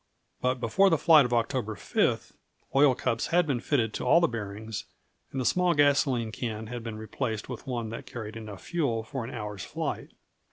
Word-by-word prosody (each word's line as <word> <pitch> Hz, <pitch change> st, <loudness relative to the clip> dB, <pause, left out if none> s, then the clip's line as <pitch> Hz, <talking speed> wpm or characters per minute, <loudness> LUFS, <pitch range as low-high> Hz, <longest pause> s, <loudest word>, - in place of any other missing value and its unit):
But 125 Hz, 0 st, +1 dB
before 190 Hz, -, +4 dB
the 165 Hz, -, +3 dB
flight 150 Hz, -6 st, +6 dB
on 120 Hz, -, +4 dB
October 115 Hz, -2 st, -2 dB
5, -, -, 0 dB, 0.4 s
oil 135 Hz, -2 st, +6 dB
cups 115 Hz, -2 st, -1 dB
had 175 Hz, 0 st, +3 dB
been 135 Hz, -5 st, 0 dB
fitted 115 Hz, -4 st, 0 dB
to -, -, -3 dB
all 170 Hz, -, +6 dB
the 170 Hz, -, +4 dB
bearings, 110 Hz, -2 st, -5 dB, 0.5 s
and 135 Hz, -, -3 dB
the 130 Hz, -, -1 dB
small 180 Hz, +2 st, +3 dB
gasoline 140 Hz, -5 st, +3 dB
can 110 Hz, -1 st, -4 dB
had 120 Hz, +2 st, -6 dB
been 115 Hz, -2 st, -5 dB
replaced 110 Hz, 0 st, -3 dB
with 125 Hz, +2 st, -7 dB
one 120 Hz, -3 st, -2 dB
that 115 Hz, -, -7 dB
carried 110 Hz, -2 st, -7 dB
enough 105 Hz, -4 st, -8 dB
fuel 140 Hz, -10 st, -1 dB
for 125 Hz, +3 st, -5 dB
an 115 Hz, -, -6 dB
hour's 105 Hz, -5 st, -5 dB
flight. -, -, -4 dB
120 Hz, 195 wpm, -28 LUFS, 110-140 Hz, 0.5 s, flight